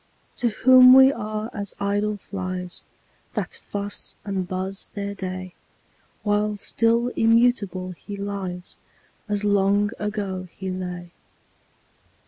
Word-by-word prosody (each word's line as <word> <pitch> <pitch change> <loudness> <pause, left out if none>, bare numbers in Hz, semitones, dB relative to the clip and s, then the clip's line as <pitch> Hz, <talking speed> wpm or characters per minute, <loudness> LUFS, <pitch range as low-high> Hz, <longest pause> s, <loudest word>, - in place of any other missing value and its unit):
To 240 - +1
whom 255 +3 +8
we 265 +1 +8
are 215 -1 -4
as 200 -1 -5
idle 205 +1 0
flies, 185 -2 -5 0.5
That - - -2
fuss 205 0 -5
and 190 -3 -2
buzz 190 +1 -3
their 200 0 -3
day; 185 -2 -6 0.7
While 210 0 +1
still 230 +3 +2
immutable 225 -6 +2
he 200 +3 -8
lies, 195 -3 -5 0.5
As 205 0 -1
long 205 0 +3
ago 200 -3 -3
he 190 -1 -4
lay. 180 -1 -5
200 Hz, 110 wpm, -24 LUFS, 185-215 Hz, 0.7 s, whom